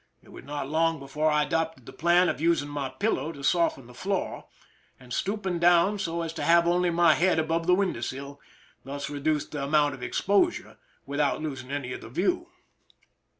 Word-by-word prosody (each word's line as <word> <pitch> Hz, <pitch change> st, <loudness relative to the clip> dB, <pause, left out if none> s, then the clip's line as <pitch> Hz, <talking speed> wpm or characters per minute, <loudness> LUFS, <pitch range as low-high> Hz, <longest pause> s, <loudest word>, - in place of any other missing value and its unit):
It -, -, -19 dB
was -, -, -11 dB
not 145 Hz, -1 st, -4 dB
long 165 Hz, +2 st, +1 dB
before 150 Hz, +3 st, -1 dB
I 150 Hz, 0 st, +3 dB
adopted 160 Hz, +1 st, -2 dB
the -, -, -11 dB
plan 175 Hz, +2 st, +3 dB
of 140 Hz, -, -2 dB
using 165 Hz, -3 st, +2 dB
my 145 Hz, -2 st, -3 dB
pillow 200 Hz, -5 st, -1 dB
to 140 Hz, -2 st, -11 dB
soften 165 Hz, -5 st, +1 dB
the 125 Hz, -, -14 dB
floor, 190 Hz, +8 st, -3 dB, 0.5 s
and 125 Hz, -2 st, -10 dB
stooping 190 Hz, -1 st, -2 dB
down 175 Hz, +4 st, +4 dB
so 170 Hz, -3 st, -2 dB
as 165 Hz, -1 st, -4 dB
to -, -, -5 dB
have 170 Hz, 0 st, +5 dB
only 175 Hz, +1 st, +2 dB
my 170 Hz, -1 st, +5 dB
head 180 Hz, +3 st, +2 dB
above 165 Hz, +1 st, 0 dB
the 180 Hz, -, +6 dB
window 185 Hz, -10 st, -1 dB
sill, 140 Hz, +3 st, -6 dB, 0.4 s
thus 140 Hz, +2 st, -5 dB
reducing 145 Hz, +1 st, -1 dB
the 145 Hz, -2 st, -4 dB
amount 145 Hz, 0 st, +2 dB
of 135 Hz, -, -10 dB
exposure 205 Hz, -, 0 dB, 0.3 s
without 140 Hz, 0 st, 0 dB
losing 135 Hz, -4 st, -5 dB
any 135 Hz, -3 st, -3 dB
of -, -, -7 dB
the -, -, -10 dB
view. 340 Hz, -, 0 dB
160 Hz, 195 wpm, -27 LUFS, 140-175 Hz, 0.5 s, the